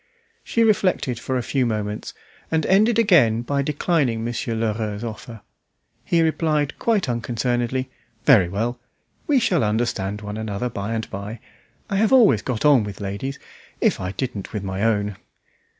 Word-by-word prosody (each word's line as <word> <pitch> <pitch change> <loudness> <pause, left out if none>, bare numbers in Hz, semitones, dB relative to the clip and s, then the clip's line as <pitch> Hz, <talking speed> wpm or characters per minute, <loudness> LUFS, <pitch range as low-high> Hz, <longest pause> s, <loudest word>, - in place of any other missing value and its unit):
She 230 - +1
reflected 185 - +1
for 130 - -2
a 125 - -2
few 135 +1 0
moments, 105 -3 -3 0.3
and 160 -1 +1
ended 215 +5 +4
by 230 - +5
again 120 - +4 0.2
declining 140 -5 0
Monsieur 115 -1 -2
Lheureux's 110 -1 -2
offer. 115 0 -7 0.6
He 170 -1 +2
replied 155 -2 0
quite 220 -7 +1
unconcernedly 120 +2 -1 0.3
"Very 105 -11 +6
well. 115 +6 -2 0.5
We 285 -3 +4
shall 185 - +2
understand 105 -2 -1
one 105 0 -6
another 110 +2 -3
by 100 +1 -4
and 110 -1 -3
by. 100 +3 -6 0.5
I 195 - -1
have 215 +1 +2
always 250 -5 +6
got 125 -2 -3
on 140 -6 +6
with 105 -1 -7
ladies 100 +8 -4 0.4
if - - +2
I 90 0 -3
didn't 115 -7 -4
with 105 -3 -3
my 95 0 -3
own!" 105 -3 0
120 Hz, 155 wpm, -22 LUFS, 105-150 Hz, 0.6 s, Very